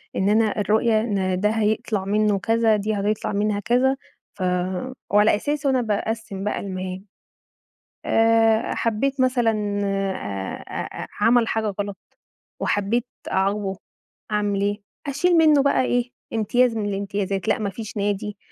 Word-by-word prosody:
إن 190 +2 +1
أنا 215 0 +2
الرؤية 220 +2 +2
إن 190 -5 0
ده 210 +2 +2
هيطلع 215 -2 0
منّه 210 0 +2
كذا، 225 +1 +3
دي 210 +1 -1
هتطلع 205 +1 -1
منها 205 0 0
كذا 250 +5 +2 0.4
ف 200 - -12 0.7
وعلى 210 +1 +5
أساسه 290 +6 -1
أنا 260 -2 +2
باقسّم 220 -2 -3
بقى 210 - -1
المهام. 185 0 -5 1.0
آآ، 225 0 +3
حبّيت 260 +5 0
مثلًا 225 -5 +1
آآ، 190 - -2
أ - - -5
أ - - -8
عمل 230 +2 +4
حاجة 220 -1 0
غلط، 200 -1 -5 0.6
وحبّيت 215 +4 0 0.3
أعاقبه، 195 0 0 0.5
أعمل 205 -1 0
إيه؟ 205 +1 -1 0.3
أشيل 335 +6 +2
منّه 305 -3 +5
بقى 280 - +3
إيه، 245 -1 0 0.2
امتياز 230 +2 +2
من 210 - -1
الامتيازات 195 -1 -2
لأ - - +2
ما 210 -2 -1
فيش 215 +2 -7
نادي، 205 0 -2
210 Hz, 140 wpm, -23 LUFS, 200-230 Hz, 1.0 s, وعلى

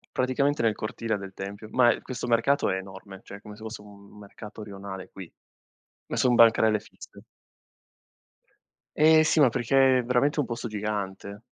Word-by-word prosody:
Praticamente 140 +3 0
nel 110 -2 +1
cortile 110 +1 -3
del 100 -1 -9
tempio, 100 +3 -8
ma 120 -2 +4
è - - -8
questo 125 -1 -6
mercato 120 +5 +2
è - - 0
enorme, 95 0 -9
cioè 100 - -11
come 105 0 -12
se 110 - -17
fosse 110 -1 -7
un 100 0 -16
mercato 105 +1 -11
rionale 100 -2 -9
qui, 95 -4 -11 0.8
ma - - -5
son 125 -2 +3
bancarelle 110 -2 +5
fisse. - - -15 1.8
Eh 155 +1 +6
sì, 155 +1 +2
ma 145 - +7
perché 130 +1 +2
veramente 125 +4 +1
è - - +1
un - - -3
posto 120 0 -5
gigante. 105 -1 -5
110 Hz, 165 wpm, -26 LUFS, 100-125 Hz, 1.8 s, ma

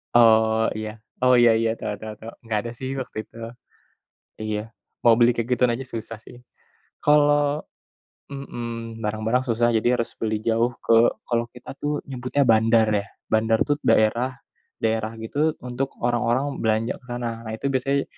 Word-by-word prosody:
Oh 110 -1 +5
iya, 110 0 -6 0.2
oh 125 - +6
iya 120 -1 +7
iya, 115 0 +1
tau 105 -2 -5
tau 110 0 -6
tau, 115 - -8
gak 110 -2 0
ada 115 - -4
sih 130 0 -3
waktu 125 - -9
itu. - - -18 1.0
Iya, 110 -1 -2 0.4
mau 115 -1 +5
beli 120 0 +5
kayak 115 0 -3
gituan 125 -1 +3
aja 120 - -4
susah 115 0 -5
sih. 120 - -12 0.7
Kalau 145 0 +3 0.7
mhm 115 -4 -6
barang-barang 110 +4 0
susah 120 0 +2
jadi 120 +3 +2
harus 115 - -2
beli 110 -1 0
jauh 115 +2 +2
ke 115 - +5 0.3
kalau 120 -1 0
kita 125 - -9
tuh 145 0 -1
nyebutnya 130 +2 0
bandar 110 0 +4
ya, 100 - -14 0.2
bandar 110 0 +3
tuh 145 - +2
daerah, 120 +4 +2 0.5
daerah 110 -1 0
gitu 150 +8 0
untuk 125 +2 -3
orang-orang 120 +3 +1
belanja 110 +1 +1
ke - - -22
sana, 115 -2 -4
nah 110 - -5
itu 125 - -3
biasanya, 135 +2 +1
115 Hz, 160 wpm, -24 LUFS, 110-125 Hz, 1.0 s, iya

